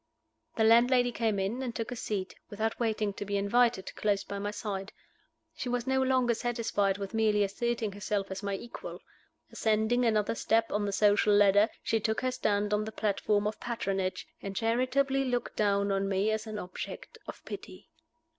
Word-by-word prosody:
The 220 - +2
landlady 245 +2 +5
came 225 -3 0
in, 195 +7 -1
and 245 -3 -4
took 230 +1 -3
a - - -3
seat, 200 -5 -3 0.2
without 220 +2 -2
waiting 220 -3 0
to 205 - -5
be 200 0 -1
invited, 230 +1 +2
close 205 -2 0
by 200 - -5
my 205 +1 -2
side. 200 -2 -4 0.6
She 250 - -4
was 245 -1 -1
no 265 0 +2
longer 260 -2 +3
satisfied 220 -4 0
with 200 0 -6
merely 215 -2 +3
asserting 225 +2 -1
herself 200 0 -3
as 190 - -4
my 200 -1 -2
equal. 235 +5 -8 0.5
Ascending 220 +3 +1
another 215 -3 +2
step 225 0 +1
on 205 0 0
the 200 - -1
social 205 +1 +4
ladder, 205 +2 +5
she 225 - +1
took 220 +1 -1
her 255 - 0
stand 210 -4 0
on 210 0 +1
the 220 - -5
platform 205 -1 0
of 210 0 -2
patronage, 195 -5 -2 0.2
and 195 0 -6
charitably 255 +5 +1
looked 245 -2 -2
down 200 -1 +2
on 195 0 0
me 195 +2 +1
as 220 +1 -2
an 215 -1 -5
object 180 -2 -7
of - - -9
pity. 320 - -9
215 Hz, 185 wpm, -30 LUFS, 200-235 Hz, 0.6 s, landlady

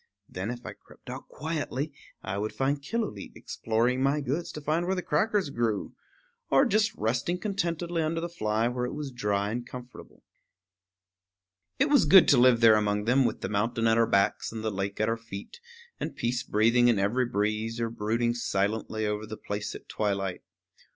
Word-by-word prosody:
Then, 95 +4 -5
if 120 0 -6
I - - -6
crept - - -14
out - - -8
quietly, 150 -1 -3 0.3
I 95 +1 -3
would 110 +1 -3
find 140 +2 0
Killooleet 175 - -4
exploring 120 +3 -1
my 140 +2 +2
goods 145 +5 -2
to - - -5
find 155 +4 -1
where 190 - +1
the 180 - -3
crackers 195 0 +1
grew, 115 -4 -1 0.6
or 275 - +5
just 215 -2 +2
resting 120 +10 -1
contentedly 175 -3 -2
under 160 +1 -1
the 170 - -3
fly 110 -9 0
where 125 0 -2
it - - -6
was 145 -2 -5
dry 105 -4 -1
and 120 +2 -3
comfortable. 125 0 -11 1.5
It 275 +3 +2
was 290 - +5
good 190 -3 +8
to 140 - +6
live 120 -1 +5
there 110 -2 +7
among 105 0 0
them, 130 +3 +4
with - - -1
the - - -3
mountain 115 +3 0
at 115 0 +4
our 115 - +4
backs 100 0 +1
and 110 -1 -6
the 110 - -1
lake 100 0 -3
at 110 - +2
our 115 0 0
feet, 115 - -9 0.4
and - - -4
peace 120 +1 -1
breathing 115 +1 +3
in 120 -3 +4
every 115 +6 +1
breeze 110 +1 -1
or 115 -1 -1
brooding 115 +2 0
silently 110 -1 -1
over 105 0 -2
the 110 0 -7
place 105 0 -4
at - - -11
twilight. 100 -3 -2
120 Hz, 190 wpm, -28 LUFS, 105-145 Hz, 1.5 s, good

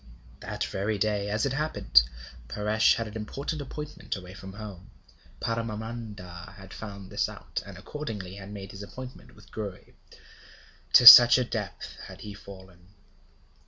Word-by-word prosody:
That - - -4
very 100 +2 -2
day, 105 0 -1
as 105 +4 0
it 135 - -1
happened, 135 - +3 0.5
Paresh 105 - +2
had 115 -1 -3
an 105 - -10
important 140 +8 -5
appointment 150 +2 -6
away 90 -2 -10
from 95 0 -10
home. 100 -3 -10 0.5
Paramananda 110 -6 -5
had 95 -1 -12
found 100 -3 -9
this - - 0
out, - - -6
and - - -10
accordingly 105 -11 -7
had 100 0 -10
made 100 -1 -8
his 100 - -10
appointment 125 +5 -10
with 105 0 -19
Gouri. 100 -4 -7 1.0
To 125 - +7
such 120 +1 +12
a 130 - +2
depth 110 -4 -6
had - - -12
he 105 - -8
fallen! 95 -1 -14
105 Hz, 150 wpm, -27 LUFS, 95-115 Hz, 1.0 s, such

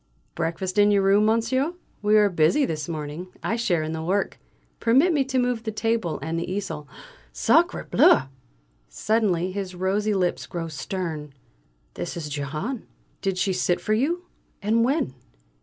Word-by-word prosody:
"Breakfast 185 +4 -2
in 205 0 +6
your 200 -1 +3
room, 200 +2 +4
monsieur? 260 +8 +1 0.3
We 210 0 +4
are 210 -1 +6
busy 175 - +3
this 155 - -4
morning; 155 +2 -5 0.2
I 225 - 0
share 180 -9 +1
in 155 - -3
the 160 0 -3
work. 190 +5 -1 0.4
Permit 270 +10 +4
me 285 -3 +3
to 265 0 -1
move 245 -2 +1
the 220 -1 -3
table 225 -5 -1
and 165 +1 -2
the 170 - -4
easel 165 -7 -4 0.4
Sacré - - +2
bleu!" - - +6 0.7
Suddenly 185 - +1
his 190 -1 -4
rosy 200 +3 0
lips 180 -2 0
grow 170 -3 -4
stern. 155 -3 -5 0.6
"This 90 - -5
is 155 -3 -5
Jehane. 150 - -4 0.3
Did 195 -2 -1
she 190 +1 +1
sit 180 -1 +1
for 215 - -1
you 330 +11 0 0.3
and 220 +3 +2
when? 260 - +1
195 Hz, 160 wpm, -25 LUFS, 165-225 Hz, 0.7 s, in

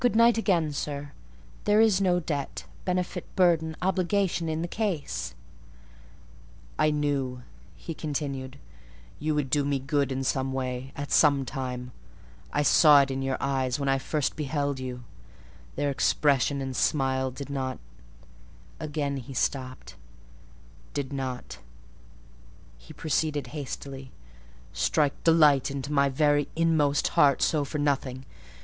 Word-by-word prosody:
"Good 245 -3 +2
night 230 +1 +6
again, 180 -9 +1
sir. 145 0 -4 0.5
There 210 +1 +4
is 215 -4 +4
no 180 -2 +3
debt, 145 -4 -4 0.2
benefit, 180 -1 -1
burden, 165 -3 +3
obligation, 185 -2 +1
in 160 +1 -2
the - - -2
case." 185 -7 -3 1.4
"I 155 - +4
knew," 140 -4 -1 0.3
he 165 - -7
continued, 140 -4 -4 0.6
"you 155 +1 0
would 140 -3 -1
do 145 0 +3
me 140 0 0
good 140 +1 0
in 135 0 -2
some 130 0 -1
way, 130 0 -3
at 145 0 -5
some 140 -3 +4
time;—I 125 - -6
saw 145 -1 +7
it 135 - -4
in 135 0 -2
your 135 0 -1
eyes 135 0 0
when 140 -1 0
I 135 0 +2
first 150 +1 -1
beheld 145 -2 -2
you: 125 -1 -6 0.7
their 145 0 0
expression 140 0 +2
and 135 -1 -4
smile 130 -3 +1
did 140 +2 -8
not"—(again 130 - -6
he 135 +1 -8
stopped)—"did 115 - -6
not" 130 -2 -5 1.2
(he - - -14
proceeded 155 -2 -1
hastily) 135 -2 -6 0.6
"strike 140 - +1
delight 150 -5 +5
to 140 0 -4
my 140 -1 +3
very 145 +1 +2
inmost 160 -3 +2
heart 140 -2 +4
so 150 -2 +2
for 140 +2 -4
nothing. 135 -3 -1
140 Hz, 130 wpm, -27 LUFS, 130-155 Hz, 1.4 s, saw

